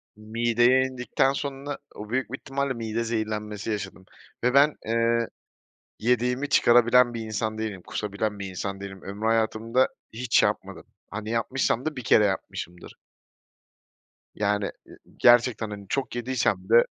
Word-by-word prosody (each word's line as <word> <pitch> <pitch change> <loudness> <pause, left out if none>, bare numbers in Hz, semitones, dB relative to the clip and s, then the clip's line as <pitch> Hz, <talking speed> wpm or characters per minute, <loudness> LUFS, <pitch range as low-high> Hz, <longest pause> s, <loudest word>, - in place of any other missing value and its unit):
Mideye 120 +4 +2
indikten 130 +1 0
sonra 140 0 -4 0.2
o 105 0 -8
büyük 130 +1 -1
bir 135 - -3
ihtimalle 140 0 -2
mide 115 0 -3
zehirlenmesi 110 -2 -3
yaşadım 95 -3 -5 0.4
ve 125 - +2
ben, 145 +2 +5
eee, 115 +1 +1 0.7
yediğimi 125 +4 +1
çıkarabilen 120 -1 +5
bir 115 - -3
insan 110 0 -3
değilim, 105 -4 -4
kusabilen 105 0 -3
bir 100 - -4
insan 100 +1 -5
değilim. 95 -1 -8
Ömrü 100 +3 -5
hayatımda 115 +2 +2 0.2
hiç 120 +1 +2
yapmadım. - - -2 0.3
Hani, 110 +1 -5
yapmışsam 120 +1 0
da 155 - -2
1 130 - -6
kere 105 - +5
yapmışımdır. 90 -3 -4 1.4
Yani, 105 -1 0 0.2
ııı, - - -14 0.2
gerçekten, 120 -2 +4
hani, 100 -1 -8
çok 135 -3 -2
yediysem 115 -6 -1
de 115 +1 +7
115 Hz, 140 wpm, -26 LUFS, 105-125 Hz, 1.4 s, de